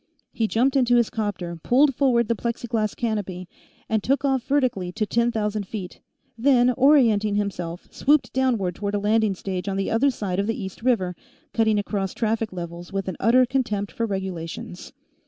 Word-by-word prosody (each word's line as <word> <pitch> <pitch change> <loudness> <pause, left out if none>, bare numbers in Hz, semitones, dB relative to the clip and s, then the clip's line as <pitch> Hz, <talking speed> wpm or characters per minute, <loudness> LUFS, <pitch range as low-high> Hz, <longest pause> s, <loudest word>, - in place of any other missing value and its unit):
He 225 - 0
jumped 255 +6 +1
into 245 -2 +4
his 235 -2 +3
'copter, 200 -7 -3
pulled 275 - +4
forward 240 -4 +2
the 235 - +2
plexiglass 230 -1 -2
canopy, 200 -6 -3 0.4
and 220 -1 0
took 275 +6 0
off 265 -2 +2
vertically 245 -10 0
to 215 - -1
ten 235 +3 +1
thousand 210 -2 -2
feet, 190 -4 -7 0.4
then, 250 0 +4
orienting 235 -6 +4
himself, 180 -4 -3
swooped 295 +1 +2
downward 235 -9 +1
toward 200 +3 -3
a - - +1
landing 210 0 +2
stage 185 +1 -4
on 195 - -2
the 195 - -1
other 245 +5 +3
side 195 -7 -3
of 200 - 0
the 225 - -2
East 190 +2 -7
River, 220 -8 +1 0.4
cutting 220 -2 +2
across 200 -2 -2
traffic 225 -1 -1
levels 175 0 -7
with 195 0 -3
an 185 - -4
utter 250 +4 +5
contempt 235 -6 -1
for 230 - -2
regulations. 185 -3 -5
215 Hz, 175 wpm, -24 LUFS, 195-240 Hz, 0.4 s, utter